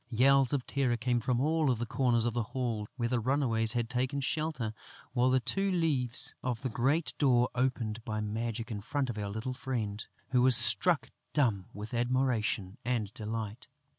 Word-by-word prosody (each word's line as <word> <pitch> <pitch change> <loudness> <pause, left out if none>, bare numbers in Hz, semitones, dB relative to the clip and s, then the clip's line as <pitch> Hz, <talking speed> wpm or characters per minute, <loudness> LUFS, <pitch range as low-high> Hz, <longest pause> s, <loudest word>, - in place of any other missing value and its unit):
Yells 135 +2 +4
of 135 -4 -1
terror 130 -4 0
came 120 0 0
from 120 +1 -1
all 155 0 +1
the 120 +1 -4
corners 120 -1 +1
of 120 - -1
the 120 - -1 0.2
hall, 115 -5 -2
where 120 -3 -1
the 120 0 0
runaways 115 -3 +2
had 120 -2 -1
taken 125 +3 -2
shelter, 150 -6 -2 0.4
while 125 0 +2
the 130 0 +3
two 195 - -1
leaves 145 -9 +1
of 125 -2 -3
the 130 - -1
great 140 +9 0
door 125 -4 +3
opened 120 -3 -2
by 110 -2 -4
magic 115 +2 -4
in 105 -2 -4
front 135 +3 -2
of 110 - -9
our 100 -1 -3
little 110 +5 -4
friend, 115 -6 -4 0.2
who 125 -1 +3
was 125 -1 +7
struck 120 - +6 0.2
dumb 110 -11 +1
with 105 +3 -8
admiration 120 -5 -1
and 115 -4 -2
delight. 110 0 -6
120 Hz, 180 wpm, -30 LUFS, 110-130 Hz, 0.4 s, was